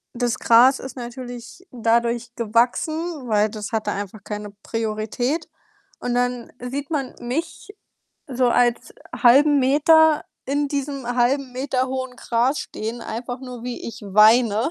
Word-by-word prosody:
Das 240 -1 -1
Gras 250 +4 +5
ist 265 -1 -8
natürlich 245 +5 -8
dadurch 235 0 0
gewachsen, 255 +7 0
weil 215 -1 +2
das 210 -1 -7
hatte 215 -2 -1
einfach 200 0 -6
keine 210 0 -6
Priorität 225 +7 -2 0.5
und 245 - -2
dann 245 -1 -1
sieht 270 +3 -5
man 285 -5 -2
mich 310 +12 -4 0.6
so 255 -2 +1
als 240 0 +1 0.2
halben 285 +4 +5
Meter 305 +3 +4 0.2
in 285 +1 -1
diesem 275 -2 -4
1/2m 255 +1 0
hohen 260 -1 -4
Gras 245 +4 0
stehen, 225 +3 -5
einfach 245 +3 -5
nur, 250 -3 -8
wie 245 -1 -5
ich 230 +1 -8
weine, 215 +4 +4
245 Hz, 130 wpm, -22 LUFS, 230-270 Hz, 0.6 s, Gras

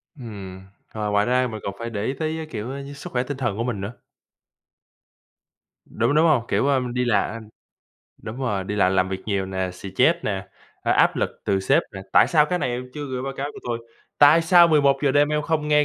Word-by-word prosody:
Ừm. 100 -7 -9 0.3
Ờ, 105 -1 -3
ngoài 105 0 +2
ra 125 +1 +2
mình 110 -3 -6
còn 100 - -4
phải 115 0 -4
để 105 -2 -4
ý 130 - -1
tới, 160 0 -2
a, 160 - -5
kiểu, 110 +2 -5
a, 140 +1 -6
sức 140 - -8
khỏe 125 0 +1
tinh 140 +1 -5
thần 120 -7 -2
của 115 - -1
mình 115 -5 -3
nữa. 100 +4 -5 1.9
Đúng, 120 +6 0
đúng 160 - +5
hông? 150 -8 +3
Kiểu, 140 - +1
ơ, 135 -2 +3
đi 125 0 0
là, 105 -3 +1
ưm 110 -2 -9 0.7
đúng 110 - -7
rồi, 105 -7 -1
đi 100 - -4
làm 95 -2 +3
làm 95 0 +2
việc 95 0 -4
nhiều 100 -2 -1
nè, 95 -1 -3
stress 95 - +1
nè, 95 -1 -3 0.3
a, - - +2
áp - - +3
lực - - 0
từ 95 -1 +1
sếp 95 - +3
nè: 95 - -7
"Tại - - +6
sao 150 -3 +4
cái 180 +3 -1
này - - -1
em 125 +1 -5
chưa 145 -1 -5
gửi 130 -1 -4
báo 135 0 -4
cáo 140 - -2
cho - - -11
tôi, 120 -1 -1 0.4
tại 150 +3 +7
sao 175 0 +6
11:00 140 -2 +3
đêm 145 +1 +4
em 150 0 0
không 155 -1 -1
nghe 150 0 +4
125 Hz, 235 wpm, -23 LUFS, 105-145 Hz, 1.9 s, tại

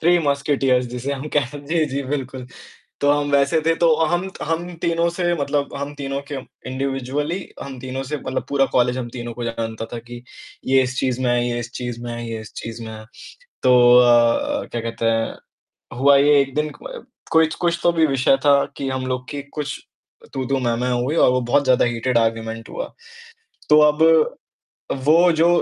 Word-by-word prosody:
3 175 +2 +4
musketeers 140 -3 +1
जिसे 125 +3 -4
हम 140 +2 -5
कह 140 -4 +3
जी, 155 +3 0
जी, 140 0 -3
बिल्कुल। 130 -2 -4 0.6
तो 145 - +3
हम 145 0 0
वैसे 140 +3 +3
थे, 165 - +4
तो 165 -1 +4
हम 175 +4 -1
हम 170 +2 -3
तीनों 170 0 +1
से 175 0 -1
मतलब 140 0 -1
हम 140 +1 -5
तीनों 135 -1 -4
के - - -2 0.3
इंडिविजुअली 135 +5 -2 0.2
हम 135 -2 -8
तीनों 130 +1 -5
से 150 +3 -4
मतलब 130 -1 -4
पूरा 140 -1 +3
कॉलेज 125 0 +2
हम 120 -2 -4
तीनों 120 -1 -6
को 120 +1 -6
जानता 115 -1 -4
था - - -3
कि 120 0 -9 0.5
ये 135 0 +5
इस 130 +1 -4
चीज़ 130 -1 -1
में 125 - +1
है 120 0 +1
ये 120 0 -2
इस 120 +1 -7
चीज़ 120 -1 -5
में 120 - -5
है 120 0 -6
ये 115 - -4
इस 110 - -12
चीज़ 115 0 -7
में 110 - -7
है। 110 0 -10 0.6
तो 125 -1 +5 0.2
अ, 120 -1 +3
क्या 120 - -3
कहते 115 0 -5
हैं, 115 0 0 0.6
हुआ 140 +1 +6
ये 145 0 +5
एक 135 -1 -2
दिन 150 0 0
क - - -8 0.3
कोई 160 0 +5
कुछ 170 -1 +1
तो 175 - +4
भी 165 -1 +2
विषय 135 -1 +3
था 140 -1 +5
कि 135 -1 -3
हम 130 -1 -3
लोग 125 0 -3
की 145 -1 -4
कुछ 140 0 -5 0.6
तू-तू, 135 0 -1
मैं-मैं 125 0 -1
हुई 140 +5 -1
और - - +5
वो 125 0 +1
बहुत 140 +4 +1
ज़्यादा 130 -2 +4
हीटिड 120 +1 0
आर्गुमेंट 115 0 -2
हुआ। - - -4 0.9
तो 150 0 +7
अब 150 +1 0 1.0
वो 170 +3 +5
जो 165 +2 +3
135 Hz, 195 wpm, -21 LUFS, 120-145 Hz, 1.0 s, तो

